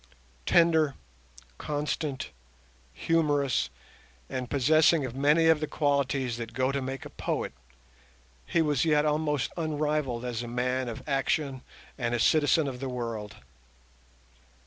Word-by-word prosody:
Tender, 160 -4 +4 0.6
constant, 145 -1 -3 0.6
humorous, 145 - +1 0.6
and 125 -2 -3
possessing 155 +2 +4
of 125 - -5
many 150 +4 +3
of 160 -1 +5
the 155 - -2
qualities 140 -5 0
that 115 -1 -7
go 130 +1 +1
to 140 0 -2
make 135 0 -5
a - - -7
poet, - - -3 0.9
he 165 - +2
was 150 -4 +1
yet 150 -2 +3
almost 150 -2 0
unrivalled 150 -6 -1
as 120 -2 -3
a 120 - -6
man 125 +1 -1
of 115 - -8
action 135 -1 0 0.4
and 120 -1 0
a - - -1
citizen 150 +5 +3
of 130 -2 -5
the 135 0 -4
world. 115 -4 -5
140 Hz, 130 wpm, -28 LUFS, 125-150 Hz, 0.9 s, of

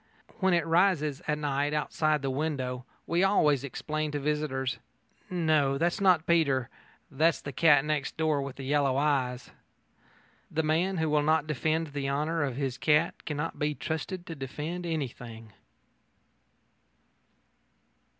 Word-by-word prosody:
When 190 -2 +3
it 170 - +1
rises 165 -4 +2
at 150 -1 +1
night 145 0 -1
outside 150 0 0
the 135 - 0
window, 130 -3 -2 0.2
we 170 +2 +1
always 150 -9 +3
explain 155 +3 -3
to 145 - -1
visitors: 140 -3 -1 0.5
"No; 155 -6 +2
that's 170 +7 0
not 180 -4 +4
Peter. 140 -7 +2 0.4
That's 155 +3 +2
the 140 - -7
cat 145 +2 +4
next 150 -3 -2
door 155 -2 +1
with 135 -1 -6
the 135 - -8
yellow 135 -1 +1
eyes." 130 -4 0 1.0
The 160 +1 -1
man 170 +5 +1
who 160 -1 0
will 150 -1 +2
not 155 0 +2
defend 155 +2 -1
the 140 -1 -2
honour 155 +4 0
of 135 -4 -1
his 135 -2 -3
cat 155 +2 +1
cannot 150 +2 -3
be 150 0 0
trusted 175 +4 -4
to 165 - -6
defend 155 +5 -5
anything. 120 -8 -5
150 Hz, 140 wpm, -29 LUFS, 135-160 Hz, 1.0 s, not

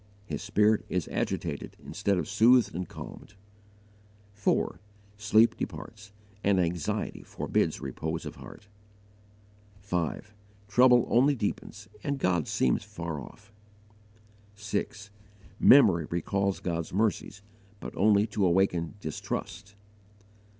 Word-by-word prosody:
His - - -5
spirit 105 +1 +2
is 90 -4 -1
agitated - - -3
instead 100 -2 -1
of - - -2
soothed 115 +4 +4
and 90 +1 -4
calmed. 105 - -10 1.0
4. 100 0 0 0.4
Sleep 110 +2 +4
departs, 105 -2 -7 0.3
and 100 -1 +3
anxiety 85 -3 -2
forbids - - -1
repose 80 +1 -4
of - - -7
heart. 100 - -12 1.1
5. 95 +1 -3 0.3
Trouble 125 +3 +5
only 135 +4 +4
deepens 105 -2 -4 0.2
and 140 0 -1
God 90 - 0
seems 60 - +1
far 85 -3 -6
off. 100 +8 -14 1.0
6. 105 0 -4 0.5
Memory 90 - +6
recalls 100 +3 -1
God's 85 -2 -3
mercies, 100 -1 -1 0.4
but - - -8
only 105 0 +4
to 105 -2 -2
awaken 90 -1 +1
distrust. 100 +5 -5
100 Hz, 110 wpm, -28 LUFS, 90-105 Hz, 1.1 s, Memory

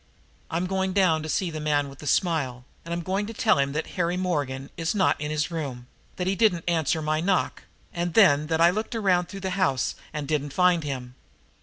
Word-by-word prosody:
"I'm 170 +3 -1
going 190 0 -1
down 180 -5 +3
to 155 - -6
see 175 +4 0
the 155 - -5
man 145 -1 +1
with 135 -1 -12
the 150 - -8
smile, 135 -7 0 0.2
and 170 - -8
I'm 170 0 -2
going 195 +4 -1
to 225 - -7
tell 215 -9 +3
him 140 0 +1
that 155 +2 -2 0.2
Harry 175 +1 0
Morgan 145 -7 -2
is 165 +4 -2
not 190 -6 +2
in 150 - -2
his 155 +2 -1
room, 135 -7 -4 0.3
that 180 - -3
he 190 +1 +1
didn't 190 -6 +2
answer 160 -2 +1
my 155 +1 0
knock, 185 +1 0 0.3
and 175 0 -2
then 155 -9 +5
that 160 0 0
I 170 +1 +7
looked 220 +5 -3
around 185 -5 +2
through 195 -1 -8
the 190 0 -2
house 135 -9 +1 0.2
and 150 -2 -4
didn't 145 -2 -1
find 180 -1 +3
him. 130 -4 -5
165 Hz, 220 wpm, -26 LUFS, 145-185 Hz, 0.3 s, I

